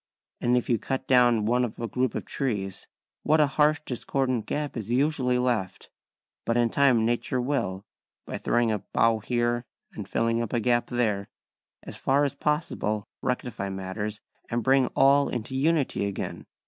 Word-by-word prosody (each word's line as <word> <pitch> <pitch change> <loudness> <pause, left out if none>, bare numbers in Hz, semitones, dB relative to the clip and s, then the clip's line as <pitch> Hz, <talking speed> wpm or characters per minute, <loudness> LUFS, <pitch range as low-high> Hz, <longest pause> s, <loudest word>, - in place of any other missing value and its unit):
And 125 +1 +2
if 125 - -1
you 115 -3 +2
cut 130 +3 -3
down 120 -4 +4
one 125 +3 +2
of 120 - -4
a 115 - -2
group 125 +2 -1
of - - -3
trees, 100 -8 -3 0.3
what 155 +1 +3
a 150 - +6
harsh 150 +2 +2
discordant 125 -1 -1
gap 150 -1 -3
is 110 -3 -5
usually 130 -1 +1
left; 120 -7 -2 0.5
but 115 - 0
in 120 -1 +2
time 130 -5 +4
nature 120 +2 0
will, 120 -7 -2 0.4
by - - -5
throwing 120 -1 +1
a 105 - 0
bough 115 +3 +1
here 120 +2 0 0.3
and - - -7
filling 115 0 +1
up 115 - -4
a 120 - +2
gap 120 +1 +1
there, 110 -5 0 0.6
as - - -8
far 140 +2 +2
as 145 - 0
possible 140 -8 -1 0.2
rectify 125 -5 -2
matters 95 +3 -4 0.3
and 120 0 -1
bring 135 +1 +4
all 140 +1 +5
into 125 +2 -4
unity 140 -7 +1
again. 100 - -5
120 Hz, 170 wpm, -26 LUFS, 110-135 Hz, 0.6 s, a